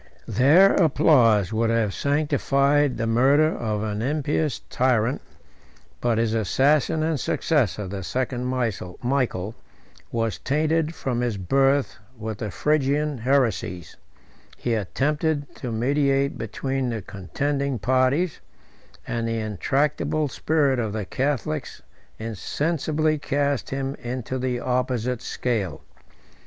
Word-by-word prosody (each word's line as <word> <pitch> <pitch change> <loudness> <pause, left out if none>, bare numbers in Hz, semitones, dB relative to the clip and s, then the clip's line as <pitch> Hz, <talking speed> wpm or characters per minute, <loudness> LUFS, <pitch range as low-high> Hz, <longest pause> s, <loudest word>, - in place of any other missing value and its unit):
Their 160 +10 +5
applause 125 - +4
would 115 +1 +1
have 115 -3 +1
sanctified 145 -2 +1
the 115 - -1
murder 135 +7 +4
of 105 -2 -2
an 105 0 -3
impious 150 +2 0
tyrant, 125 0 +1 0.8
but 120 -2 +1
his 115 -1 +1
assassin 145 - +2
and 160 -2 0
successor, 115 - 0
the 95 +1 -5
second 125 +4 -2
Michael, 120 -2 -2 0.6
was 115 -1 -1
tainted 155 +3 0
from 125 -4 -2
his 120 -4 -1
birth 135 +9 +1 0.2
with 110 -2 -5
the 105 - -3
Phrygian 150 +4 0
heresies: 115 - 0 0.6
he 120 - -1
attempted 145 - -1
to 125 - -5
mediate 140 +4 +1
between 130 +4 -3
the 115 -4 -4
contending 140 +9 -2
parties; 130 - +1 0.7
and 115 -1 -2
the 115 0 -1
intractable 140 - 0
spirit 140 -2 +1
of 110 -3 -2
the 105 -2 -3
Catholics 130 - -2 0.3
insensibly 155 - -1
cast 145 -1 -1
him 135 0 -2
into 125 +1 -4
the 125 -1 -2
opposite 125 -1 -1
scale. 115 -7 -2
130 Hz, 115 wpm, -24 LUFS, 115-145 Hz, 0.8 s, Their